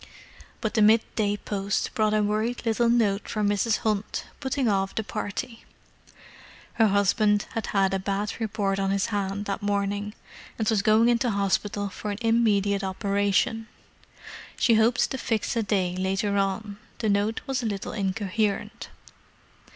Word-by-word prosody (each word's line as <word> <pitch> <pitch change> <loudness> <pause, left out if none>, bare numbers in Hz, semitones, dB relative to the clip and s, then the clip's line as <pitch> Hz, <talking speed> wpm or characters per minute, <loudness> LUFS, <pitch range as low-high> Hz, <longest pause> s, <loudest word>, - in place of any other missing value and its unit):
But 220 - -2
the 220 - +2
mid 220 +2 +6
day 205 -2 0
post 200 -1 -2
brought 215 -3 +2
a 210 - +2
worried 215 +4 -1
little 230 +1 +2
note 215 -4 +1
from 210 -2 0
Mrs. 205 +2 +1
Hunt, 210 -1 -1
putting 265 -1 -1
off 195 -2 0
the 220 - -1
party. 225 +3 -5 1.2
Her 220 - +7
husband 205 +1 +2
had 225 - -3
had 195 -1 +1
a 195 - +1
bad 200 +2 -2
report 200 -3 -1
on 195 0 0
his 195 0 +1
hand 200 0 -2
that 200 +1 -3
morning, 205 +1 -1 0.4
and 220 - -1
was 215 -3 +3
going 215 +3 +4
into 240 +1 +2
hospital 200 0 0
for 210 +2 -6
an 205 - -3
immediate 210 -4 +2
operation. 200 +3 0 0.9
She 235 - +3
hoped 225 +3 +3
to 265 - -3
fix 225 -2 -1
a 230 - +2
day 190 -4 0
later 195 +2 -1
on—the 205 +3 -3
note 205 +2 +1
was 265 -2 -1
a 230 - -2
little 200 -2 -4
incoherent. 210 +3 -2
205 Hz, 155 wpm, -26 LUFS, 200-225 Hz, 1.2 s, Her